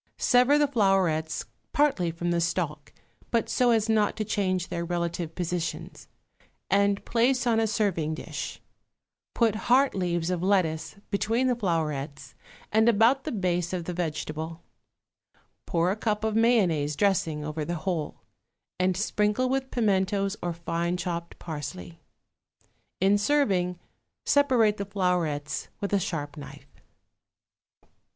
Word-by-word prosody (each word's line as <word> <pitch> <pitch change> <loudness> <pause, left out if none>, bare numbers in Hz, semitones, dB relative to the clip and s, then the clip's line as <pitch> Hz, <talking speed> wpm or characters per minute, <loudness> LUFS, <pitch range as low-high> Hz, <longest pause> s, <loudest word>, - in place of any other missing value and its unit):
Sever 250 +4 +4
the 295 -1 +3
flowerets 190 - +1 0.3
partly 280 -12 +2
from 170 +1 -2
the 170 0 +1
stalk, 155 -4 -2 0.4
but 230 -1 +1
so 250 -1 +2
as 225 -2 +3
not 215 -2 +2
to 215 - -2
change 185 -3 -1
their 170 - -3
relative 170 -1 -3
positions, 175 -1 -4 0.6
and 200 0 +2
place 250 +2 +2
on 230 -2 +3
a 225 - +2
serving 185 -7 0
dish; - - -6 0.8
put 230 -3 +3 0.2
heart 265 +3 +5
leaves 175 -2 -1
of 180 -2 -1
lettuce 160 -5 +1 0.2
between 225 +5 +1
the 250 -1 +2
flowerets 150 - -2 0.4
and 220 +2 +4
about 235 +5 +4
the - - -2
base 180 -4 -1
of 175 -2 -3
the 180 - -3
vegetable; 160 -1 -4 1.0
pour 170 +1 +1
a - - -1
cup 215 -1 -1
of 220 -1 0
mayonnaise 185 -11 +3
dressing 160 -5 +1
over 155 0 -3
the 175 +3 -3
whole, 170 -6 -2 0.6
and 185 0 +1
sprinkle 210 +4 +1
with 265 0 -1
pimentos 200 -3 +1
or 175 - -1
fine 170 +1 -2
chopped 170 -1 -4
parsley. 140 - -7 1.0
In 195 +2 +4
serving, 200 -9 +1 0.5
separate 250 -7 +3
the 200 - -3
flowerets 175 -7 -1
with 200 0 -3
a 200 - +4
sharp 150 -4 -4
knife. 145 - -12
185 Hz, 135 wpm, -27 LUFS, 165-220 Hz, 1.0 s, heart